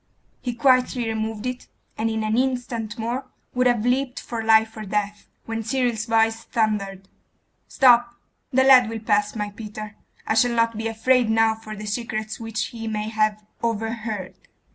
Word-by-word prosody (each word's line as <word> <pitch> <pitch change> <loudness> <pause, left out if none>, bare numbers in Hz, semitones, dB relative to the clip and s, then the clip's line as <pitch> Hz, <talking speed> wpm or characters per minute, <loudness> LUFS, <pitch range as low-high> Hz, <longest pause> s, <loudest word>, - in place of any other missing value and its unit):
He 245 -2 -3
quietly 250 -1 +3
removed 220 0 -3
it, 250 0 -4 0.3
and 225 +1 -1
in 220 -1 -2
an 215 0 0
instant 245 -3 -1
more 240 +4 -3 0.3
would 250 0 +3
have 240 -2 +1
leapt 255 +1 0
for 230 -2 -5
life 220 0 +4
or 215 - -6
death, 205 0 -3 0.2
when 225 0 -3
Cyril's 235 -1 -1
voice 225 0 +2
thundered 200 -4 -1 0.6
'Stop!' 240 -2 +4 0.4
'The 260 +1 +4
lad 255 -3 +7
will 225 - -4
pass, 210 -1 +1
my 210 -1 -3
Peter. 215 0 -8 0.3
I - - +1
shall 235 +2 +3
not 230 0 +2
be 225 +1 -2
afraid 235 +1 +2
now 225 0 +4
for 220 -1 -9
the 210 0 -7
secrets 215 0 -3
which 225 -1 -3
he 225 -1 -6
may 215 0 -2
have 215 -1 0 0.2
overheard. 225 -3 -3
225 Hz, 165 wpm, -23 LUFS, 215-240 Hz, 0.6 s, lad